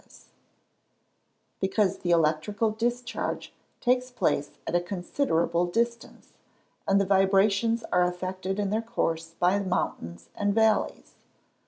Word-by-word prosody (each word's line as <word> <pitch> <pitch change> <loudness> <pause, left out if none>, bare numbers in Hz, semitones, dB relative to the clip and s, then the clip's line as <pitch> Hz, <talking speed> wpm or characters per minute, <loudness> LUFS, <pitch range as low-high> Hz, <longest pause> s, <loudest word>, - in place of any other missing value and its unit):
_ - - -19 1.4
Because 190 0 +1
the 175 - -3
electrical 170 +7 +2
discharge 240 +2 -3 0.3
takes 250 0 +1
place 245 - 0 0.2
at - - -4
a 175 - +3
considerable 175 - 0
distance, 235 +5 -3 0.5
and 195 0 +4
the 200 - +2
vibrations 200 +4 +3
are 180 0 +4
affected 185 +2 -3
in 200 -1 -1
their 220 +2 +1
course 165 -8 -2
by 180 +3 +3
mountains 85 - -3
and 205 0 0
valleys. 220 -1 +1
195 Hz, 120 wpm, -27 LUFS, 175-225 Hz, 1.4 s, and